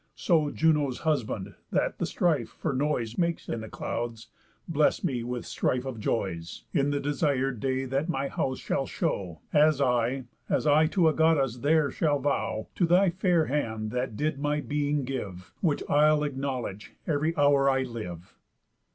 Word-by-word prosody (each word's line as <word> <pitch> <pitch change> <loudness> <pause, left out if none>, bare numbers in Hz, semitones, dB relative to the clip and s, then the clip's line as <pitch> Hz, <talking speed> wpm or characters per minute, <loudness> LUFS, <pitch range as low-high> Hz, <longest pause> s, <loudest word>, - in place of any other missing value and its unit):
So 160 -5 +2
Juno's 150 -5 +1
husband, 110 -10 -1 0.2
that - - 0
the - - 0
strife 155 -10 +1
for 155 - -3
noise 130 -4 -1
Makes 170 -1 0
in 115 - -3
the 110 - -8
clouds, 115 -1 -4 0.4
bless 155 -2 +2
me 130 -9 -1
with 125 0 -4
strife 125 0 -1
of 130 -4 -5
joys, 85 -6 -3
In 140 0 +2
the 145 0 0
desir'd 140 -3 0
day 130 +2 -1
that 135 +6 -1
my 140 -4 -1
house 130 -1 -2
shall 135 - -2
show, 95 - -3
As 150 -1 +5
I, 125 0 +1 0.2
as - - +1
I 155 +1 +5
to 170 0 +3
a 155 - +4
Goddess 150 -7 +2
there 145 +2 +2
shall 150 -3 +1
vow, 110 -6 -1
To 175 - +1
thy 180 +2 +4
fair 175 -3 +2
hand 110 -7 -2
that 125 -3 -2
did 150 -1 -1
my 150 +1 0
being 145 -1 -1
give, 100 -9 -6
Which 160 -6 +1
I'll 150 +1 +4
acknowledge 130 -8 -4
ev'ry 155 +2 0
hour 140 -1 +4
I 135 -1 +2
live." 95 -8 -7
140 Hz, 170 wpm, -28 LUFS, 120-150 Hz, 0.4 s, As